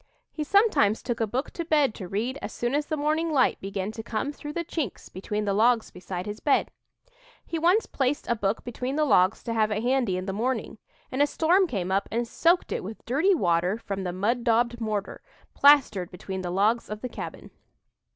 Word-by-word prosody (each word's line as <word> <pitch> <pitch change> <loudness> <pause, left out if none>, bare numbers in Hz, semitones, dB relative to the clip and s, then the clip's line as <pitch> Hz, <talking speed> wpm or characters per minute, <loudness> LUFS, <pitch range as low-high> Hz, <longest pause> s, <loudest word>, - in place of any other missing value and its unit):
He 310 - -3
sometimes 300 - +3
took 240 -2 -2
a 225 - +1
book 255 +7 -3
to 340 - -4
bed 300 -7 +2
to 185 - -7
read 230 +9 -2
as - - -5
soon 240 +2 -2
as 290 +1 0
the 310 - -2
morning 310 +3 0
light 270 -4 +2
began 195 +1 -3
to 225 - -7
come 225 +5 -3
through 295 0 -8
the 340 - -2
chinks 300 - -4
between 210 +3 -3
the 200 - +1
logs 225 +2 +3
beside 180 0 -6
his 210 +1 -6
bed. 285 - +2 0.7
He 330 - -3
once 360 +7 +3
placed 270 +1 -1
a - - +2
book 205 -1 -1
between 250 +3 -4
the 305 0 +2
logs 185 -7 +3
to 230 - -3
have 215 -1 +2
it 215 +1 -2
handy 245 -7 +1
in 185 - -4
the 195 - -3
morning, 225 0 -2 0.3
and 260 +2 0
a 290 - +5
storm 355 +6 +3
came 190 - -3
up 195 +1 +1
and 235 +2 -1
soaked 340 +9 +2
it - - -2
with 215 +4 -9
dirty 315 +11 +3
water 180 - +1
from 195 -4 -5
the 180 - -2
"mud 220 +7 0
daubed" 235 0 +1
mortar, 215 -3 -3 0.3
plastered 265 -11 +5
between 190 +1 -6
the 180 - -4
logs 210 +6 +1
of 210 0 -6
the 250 - -3
cabin. - - -8
235 Hz, 215 wpm, -26 LUFS, 200-285 Hz, 0.7 s, a